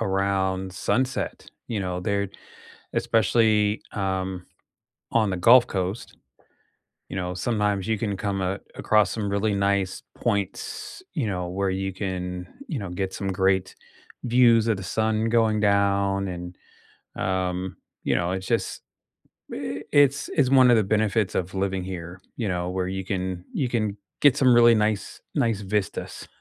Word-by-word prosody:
around 95 -1 0
sunset, 125 +7 -1 0.2
you 110 -4 -2
know, 90 -1 -3
they're, 100 +2 -1 0.6
especially, 110 -1 +2
um, 95 -2 -2 0.7
on 110 -3 +3
the 95 - -2
Gulf 120 +7 +7
Coast, 95 +3 -4 0.9
you - - -6
know, 90 -1 -2
sometimes 105 -1 0
you 110 -1 +1
can 100 -2 -2
come 100 0 -2
a 95 +2 -1 0.2
across 105 -4 +3
some 105 -3 -2
really 100 +1 +1
nice 100 -1 0
points, 100 - -3
you 145 -9 0
know, 90 -2 -2
where 95 +2 -1
you 95 0 -2
can, 90 -2 -4 0.2
you 160 - -3
know, 100 -3 -5
get 95 +1 -3
some 100 - -3
great 95 0 +1 0.5
views 120 -2 +5
of 110 - +2
the 95 - -7
sun 110 +3 0
going 110 -2 +2
down, 100 -1 +2
and, 90 0 -6 0.6
um, 95 0 -2 0.3
you - - +2
know, 90 0 0
it's 95 0 -4
just, - - -1 0.7
i 95 +1 -4
it's, 140 -1 +4
it's 135 -5 +3
one 130 -2 +7
of 120 - +6
the 110 - +3
benefits 105 0 +1
of 90 +1 -2
living 95 -1 -1
here, 90 -1 -7 0.2
you 115 - -2
know, 90 -1 -1
where 90 0 -1
you 95 +1 -3
can 95 -3 -3
you 130 - 0
can 110 -4 -1 0.2
get 145 -4 +6
some 130 -2 +5
really 120 -1 +7
nice 105 -2 -1
nice 115 -4 +1
vistas. 100 0 -3
100 Hz, 155 wpm, -25 LUFS, 95-110 Hz, 0.9 s, Gulf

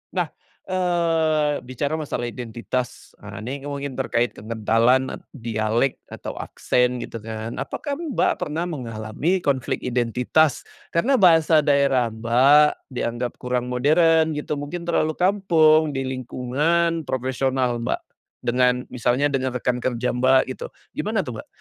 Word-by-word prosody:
nah, - - 0 0.3
eee, 165 -5 +1
bicara 140 +5 -3
masalah 135 -5 -3
identitas, 120 +1 -5
ah, 100 0 -9
ini 140 +4 -5
mungkin 140 -1 -4
terkait 120 -2 0
kekentalan 115 +4 +1
e - - -4 0.2
dialek 115 +1 -1
atau - - -7
aksen 125 0 0
gitu 115 - -7
kan. 110 +1 -6
Apakah 280 - -4
Mbak 320 -6 +1 0.2
pernah 155 +3 -2
mengalami 130 - -2
konflik 135 -3 -1
identitas 125 +5 +1 0.3
karena 255 +10 +3
bahasa 165 -4 +6
daerah 140 -4 +3
Mbak 130 +7 +4
dianggap 120 0 -2
kurang 125 0 -2
modern 160 +5 +3
gitu, 150 0 -3
mungkin 170 +4 -5
terlalu 155 -2 +1
kampung 165 -5 +4
di 135 -1 -3
lingkungan 145 +7 0
profesional 130 -1 -1
Mbak, - - -1 0.5
dengan 125 +1 +3
misalnya 125 +3 +1
dengan 130 -2 -1
rekan 125 0 -2
kerja 125 -1 -1
Mbak 130 +1 +5 0.2
gitu. - - -8 0.2
Gimana - - -1
tuh - - -5
Mbak? - - -24
130 Hz, 130 wpm, -23 LUFS, 120-155 Hz, 0.5 s, bahasa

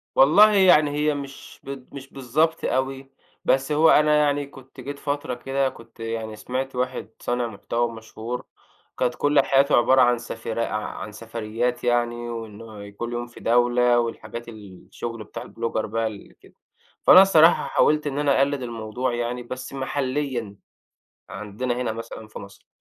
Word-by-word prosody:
والله 200 +11 +7
يعني 175 -7 +5
هي 150 +1 +1
مش 140 -1 -9
بت 135 -2 -9
مش 135 0 -10
بالضبط 150 +5 0
أوي، 135 +1 -2 0.3
بس 135 +3 +2
هو 155 +2 +5
أنا 150 0 +5
يعني 145 -1 +2
كنت 135 -1 -15
جيت 140 +2 -7
فترة 145 0 -3
كده، 135 +2 -1
كنت 115 -2 -16
يعني 115 -1 -4
سمِعت 130 +5 -4
واحد 125 -4 -3
صانع 120 0 -1
محتوى 115 +2 -2
مشهور 115 +2 -7 0.5
كانت 125 -1 0
كل 145 0 +2
حياته 135 +1 +3
عبارة 130 +2 +5
عن 120 -1 +4
سفري 115 -1 -5
عن 105 0 -5
سفريات 115 +2 -3
يعني، 120 -1 0
وإنّه 110 -2 -8
كل 120 +4 -6
يوم 120 0 -3
في 120 - -14
دولة 120 0 +3
والحاجات 120 0 -5
الشغل 110 +2 -8
بتاع - - -8
البلوجر 115 -1 -3
بقى 115 +1 -1
اللي 105 -2 -9
كده، - - -20 0.5
فأنا 185 - +9
الصراحة 170 -4 +5
حاولت 150 0 +2
إن 140 0 -2
أنا 145 -2 +2
أقلّد 140 0 +1
الموضوع 120 +1 -3
يعني 120 +1 -3
بس 130 +2 -7
محليًا 130 -5 -2 0.8
عندنا 105 +5 -4
هنا 120 -2 -2
مثلًا 110 0 -8
في - - -9
مصر، 100 0 -13
125 Hz, 155 wpm, -24 LUFS, 115-140 Hz, 0.8 s, فأنا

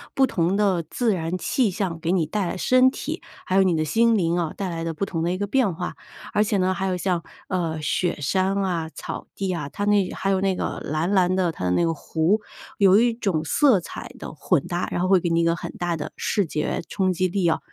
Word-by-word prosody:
不 270 - +5
同 180 -1 0
的 190 -5 +2
自 235 -4 +1
然 170 0 -2
气 240 +4 +1
象 180 -3 -2
给 165 - 0
你 180 -4 +2
带 195 +5 -2
来 185 - -3
身 255 +5 +5
体， - - -5 0.2
还 185 - -1
有 195 - +6
你 180 -2 +2
的 155 - 0
心 230 +5 +3
灵 170 -2 +1
啊， 165 -3 -1
带 195 - -2
来 165 -1 -4
的 165 0 -2
不 195 +5 -2
同 165 -4 -3
的 175 - 0
一 185 - -1
个 205 - -1
变 215 -4 +2
化。 180 +1 -4 0.4
而 210 - +4
且 215 -1 0
呢， 185 0 +2
还 190 +1 -2
有 185 -1 0
像， 180 -2 -1 0.2
呃， 165 -4 -1
雪 170 +3 0
山 190 +7 +1
啊、 170 -4 -1
草 - - -6
地 190 -2 -2
啊， 150 -4 -4
它 205 +7 -3
那 205 -3 +3
还 195 - -2
有 190 0 +1
那 195 -1 +2
个 - - -3
蓝 155 +4 -1
蓝 185 -2 +3
的， 185 -2 +1
它 - - -7
的 90 - +1
那 170 - +2
个 165 - +1
湖， 165 +7 0 0.4
有 195 +1 +6
一 235 0 +3
种 195 -9 -1
色 260 - +4
彩 - - -8
的 - - -7
混 155 0 +1
搭， 175 0 -2
然 - - -1
后 185 - +1
会 190 -1 +5
给 175 - -1
你 165 0 +2
一 - - +3
个 165 0 +2
很 - - -6
大 175 -1 -1
的 150 - -5
视 205 - 0
觉 150 -1 -2
冲 185 -2 +1
击 185 +2 +1
力 180 -1 0
啊。 160 - +2
185 Hz, 275 characters per minute, -24 LUFS, 165-195 Hz, 0.4 s, 有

